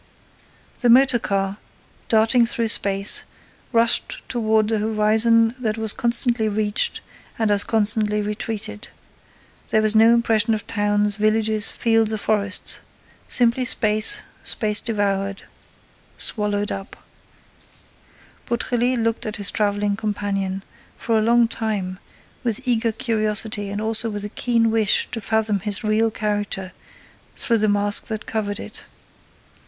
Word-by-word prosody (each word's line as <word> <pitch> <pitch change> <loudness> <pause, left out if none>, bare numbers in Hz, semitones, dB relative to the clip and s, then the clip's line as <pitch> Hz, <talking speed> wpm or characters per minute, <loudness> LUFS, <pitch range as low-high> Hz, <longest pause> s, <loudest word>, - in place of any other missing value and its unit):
The 245 - +1
motor 255 0 +5
car, 195 -1 -2 0.5
darting 225 +2 +3
through 230 -1 0
space, 200 -1 +2 0.5
rushed 230 -1 +1
toward 220 -2 +1
a 220 - +1
horizon 220 +2 +2
that 220 -3 -2
was 220 -2 +1
constantly 235 -1 +1
reached 210 0 0 0.4
and 220 -2 +1
as 205 0 +2
constantly 210 -1 +1
retreated. 215 0 -5 0.8
There 215 - +2
was 215 0 +3
no 225 +1 +6
impression 225 -1 +1
of 215 - -6
towns, 205 -1 0
villages, 215 0 +1
fields 225 -1 +1
or 220 - -2
forests; 205 -1 +1 0.5
simply 240 +1 +3
space, 215 -3 +1 0.2
space 210 -1 +1
devoured, 200 -3 -2 0.7
swallowed 205 -1 0
up. 195 0 -7 1.5
Beautrelet 245 +1 0
looked 230 -1 -2
at 215 - -4
his 200 -2 -1
traveling 205 -1 0
companion, 195 -2 -3 0.3
for 230 - -1
a 220 - +3
long 235 +1 +3
time, 205 -5 -3 0.4
with 245 +2 -2
eager 230 -2 +1
curiosity 215 -2 -1
and 205 +1 -4
also 225 +1 +2
with 205 -1 -5
a - - -5
keen 230 0 0
wish 220 -2 +2
to 225 - -5
fathom 220 -1 0
his 205 +1 -2
real 215 +1 +2
character 205 -3 -3 0.6
through 230 -2 0
the 215 0 +1
mask 205 0 +2
that 215 -1 -5
covered 205 -1 -3
it. - - -7
215 Hz, 130 wpm, -21 LUFS, 205-225 Hz, 1.5 s, no